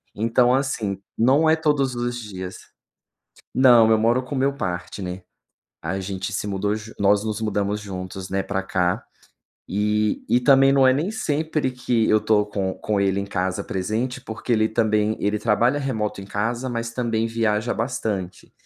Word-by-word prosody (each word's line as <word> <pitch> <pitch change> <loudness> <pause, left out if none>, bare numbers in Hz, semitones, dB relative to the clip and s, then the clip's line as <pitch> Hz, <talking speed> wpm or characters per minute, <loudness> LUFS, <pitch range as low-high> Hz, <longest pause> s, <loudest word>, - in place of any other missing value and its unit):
então 115 +3 +3
assim 115 -8 -1 0.2
não 135 +7 +4
é 160 - +5
todos 145 -5 +1
os 120 0 -2
dias 95 -4 -7 1.0
Não 120 -4 +6
eu 110 - +5
moro 115 +3 +2
com 130 +3 -6
o - - -2
meu 135 +1 +2
partner, 90 -4 -5 0.6
a 95 +4 -3
gente 95 +2 -4
se 105 - -2
mudou 100 +1 -1 0.3
nós 100 +1 +3
nos 110 -1 -3
mudamos 105 -1 -1
juntos, 95 -2 -7
né, 95 - +1
pra 95 -1 -2
cá 90 -2 0 0.7
e 105 +2 0
e 120 +2 +4
também 135 +1 +5
não 135 -1 +5
é 130 - +5
nem 160 +9 -1
sempre 155 -7 -1
que 120 -3 0
eu 110 - +5
tô 105 -2 +3
com 100 -2 -2
com 105 -2 -1
ele 100 0 +1
em 100 - -3
casa 95 -1 -2
presente, 115 +5 -2
porque 115 0 -6
ele 110 -1 +3
também 110 -1 +1
ele 105 +1 0
trabalha 120 +6 +2
remoto 110 -8 -2
em - - -9
casa, 115 +5 -2
mas 115 -1 -3
também 115 -2 0
viaja 115 0 0
bastante. 110 -6 -3
110 Hz, 170 wpm, -23 LUFS, 100-125 Hz, 1.0 s, Não